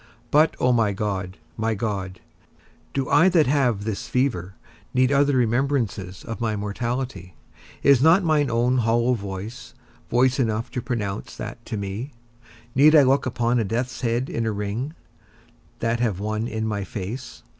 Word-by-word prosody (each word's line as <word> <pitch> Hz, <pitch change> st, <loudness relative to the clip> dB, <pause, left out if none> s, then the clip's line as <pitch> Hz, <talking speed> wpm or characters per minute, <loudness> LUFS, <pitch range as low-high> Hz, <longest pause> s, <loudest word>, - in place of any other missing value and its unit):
But, 155 Hz, +2 st, +4 dB
O 125 Hz, -, +3 dB
my 115 Hz, -4 st, +2 dB
God, 95 Hz, -2 st, -3 dB, 0.2 s
my 110 Hz, 0 st, 0 dB
God, 95 Hz, -4 st, -4 dB, 0.7 s
do 135 Hz, -2 st, -2 dB
I 150 Hz, +6 st, +5 dB
that 170 Hz, -4 st, +4 dB
have 125 Hz, -7 st, +1 dB
this 110 Hz, +2 st, -4 dB
fever 115 Hz, -7 st, -1 dB, 0.4 s
need 130 Hz, +1 st, +3 dB
other 140 Hz, 0 st, +3 dB
remembrances 120 Hz, -6 st, 0 dB
of 115 Hz, +1 st, -6 dB
my 110 Hz, -2 st, 0 dB
mortality? 105 Hz, -3 st, -4 dB, 0.5 s
Is 140 Hz, -3 st, +6 dB
not 165 Hz, +6 st, +5 dB
mine 155 Hz, -4 st, +2 dB
own 120 Hz, +2 st, +2 dB
hollow 120 Hz, +2 st, +2 dB
voice, 100 Hz, +3 st, -6 dB, 0.3 s
voice 130 Hz, +2 st, +3 dB
enough 115 Hz, -1 st, -1 dB
to 125 Hz, -, -3 dB
pronounce 115 Hz, -5 st, -4 dB
that -, -, -7 dB
to 110 Hz, -, -3 dB
me? 100 Hz, +6 st, -4 dB, 0.6 s
Need 150 Hz, +4 st, +6 dB
I 150 Hz, -, +8 dB
look 135 Hz, +1 st, +2 dB
upon 120 Hz, 0 st, +1 dB
a -, -, +2 dB
death's 120 Hz, +5 st, -3 dB
head 120 Hz, +1 st, 0 dB
in 115 Hz, -4 st, -2 dB
a -, -, +1 dB
ring, 105 Hz, +9 st, -3 dB, 0.9 s
that 115 Hz, 0 st, 0 dB
have 110 Hz, -6 st, 0 dB
one 110 Hz, +2 st, -2 dB
in 110 Hz, -1 st, -3 dB
my 105 Hz, -2 st, -2 dB
face? 105 Hz, +7 st, -7 dB
115 Hz, 160 wpm, -24 LUFS, 105-130 Hz, 0.9 s, I